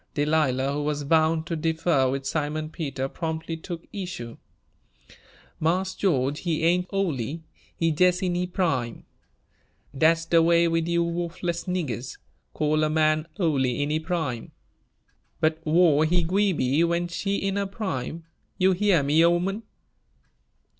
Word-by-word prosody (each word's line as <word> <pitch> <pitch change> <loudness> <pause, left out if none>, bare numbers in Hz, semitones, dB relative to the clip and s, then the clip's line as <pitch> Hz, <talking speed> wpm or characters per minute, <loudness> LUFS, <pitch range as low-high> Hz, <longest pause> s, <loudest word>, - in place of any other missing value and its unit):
Delilah, 145 -3 +1
who 145 - -2
was 145 0 -2
bound 160 +2 +2
to 170 - -3
differ 160 -4 +1
with 135 +1 -3
Simon 155 +2 -2
Peter, 135 -5 -3
promptly 160 +2 -4
took 165 +1 -7
issue. 180 - -6 1.2
"Marse 185 +4 0
George, 145 -7 0
he 165 -2 -1
ain' 180 +2 +2
ole, 195 -6 0
he 140 +7 -5 0.5
jes' 180 +2 +3
in 180 -1 0
he 180 +1 -1
prime. 140 -11 -2 0.9
Dat's 165 +3 +3
de 165 0 +4
way 170 +1 +4
wid 165 0 0
you 170 0 +2
wuffless 170 0 -3
niggers 150 -9 -3 0.3
call 155 0 +1
a 155 - +2
man 155 0 +2
ole 155 -7 +2
in 140 +4 -1
he 155 - +1
prime." 160 -8 -3 0.9
"But 160 0 +1
whar' 160 -2 +4
he 175 +2 +2
gwi' 195 +4 +2
be, 145 -1 +1
when 170 +1 0
she 195 +4 -2
in 195 0 -1
her 200 0 -1
prime? 170 - -4 0.3
You 190 +1 +4
heah 185 -4 +3
me, 150 +4 +4
'oman?" 175 +5 +1
165 Hz, 145 wpm, -25 LUFS, 150-175 Hz, 1.2 s, de